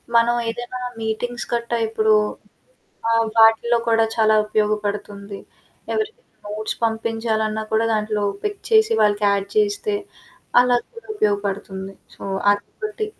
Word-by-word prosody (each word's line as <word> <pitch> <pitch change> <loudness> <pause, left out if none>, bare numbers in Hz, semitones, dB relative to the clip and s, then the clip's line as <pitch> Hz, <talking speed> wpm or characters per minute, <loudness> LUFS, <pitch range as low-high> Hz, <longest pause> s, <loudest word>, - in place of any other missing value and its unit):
మనమేదైనా 240 +1 +1 0.2
meetings 235 +2 -3
కట్టా 235 0 -1
ఇప్పుడూ 220 -1 +2 1.0
ఆహ్, 230 0 +3
వాటిల్లో 225 +1 +5
కూడా 225 0 +4
చాలా 220 -1 +4
ఉపయోగపడుతుంది. 210 -1 -2 0.5
ఎవరికైనా 445 +3 -4 0.2
నోట్స్ 215 0 -3
పంపించాలన్నా 220 -1 -1
కూడా 220 +1 +3
దాంట్లో 210 -1 -1 0.2
పిక్ 410 -1 -3
చేసి, 440 0 +5
వాళ్ళకి 205 0 +2
యాడ్ 200 0 0
చేస్తే, 420 +1 +1 0.7
అలాగ 245 -1 +3
కూడా 460 - -12
ఉపయోగపడుతుంది. 200 - -2 0.2
సో, - - -15 0.3
అది 205 - -3 0.2
బట్టి. 430 0 -3
225 Hz, 115 wpm, -21 LUFS, 210-240 Hz, 1.0 s, వాటిల్లో